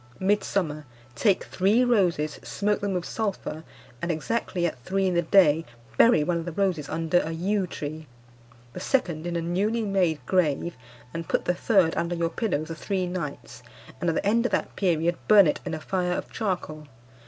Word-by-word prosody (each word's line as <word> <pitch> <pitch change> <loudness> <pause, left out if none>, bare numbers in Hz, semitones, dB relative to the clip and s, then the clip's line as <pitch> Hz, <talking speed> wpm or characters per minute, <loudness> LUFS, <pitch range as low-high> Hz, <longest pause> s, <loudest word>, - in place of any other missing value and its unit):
"Midsummer. 190 -6 0 0.3
Take 195 - +2
three 205 +7 +2
roses, 180 -11 +1
smoke 210 0 -1
them 200 -1 -1
with 180 -1 -2
sulphur, 195 -7 -3 0.4
and 170 - -2
exactly 175 +2 -1
at 160 - -2
three 195 +6 0
in 185 - +1
the 170 - +3
day 165 -3 +4 0.3
bury 230 -10 +5
one 170 +2 0
of 165 - -6
the 175 - -4
roses 175 -5 -1
under 165 +2 +1
a 160 - -3
yew 190 +3 0
tree; 155 -1 -6 0.7
the - - -6
second 175 - 0
in 175 - -3
a 170 - 0
newly 200 +7 0
made 185 -6 +1
grave, 170 -1 +1 0.4
and 165 0 -5
put - - 0
the 180 - +2
third 180 -3 +2
under 170 +1 -1
your 170 -1 0
pillow 165 -6 -1
for 165 - -6
three 185 +3 -2
nights, 175 -5 -6 0.4
and 175 - 0
at 165 - 0
the - - -1
end 230 +3 +3
of - - -9
that - - -1
period 170 -2 +1
burn 205 -3 +8
it 150 - +1
in 160 - -2
a - - -5
fire 180 +2 -1
of - - -5
charcoal. 175 -8 -3
175 Hz, 190 wpm, -26 LUFS, 160-195 Hz, 0.7 s, burn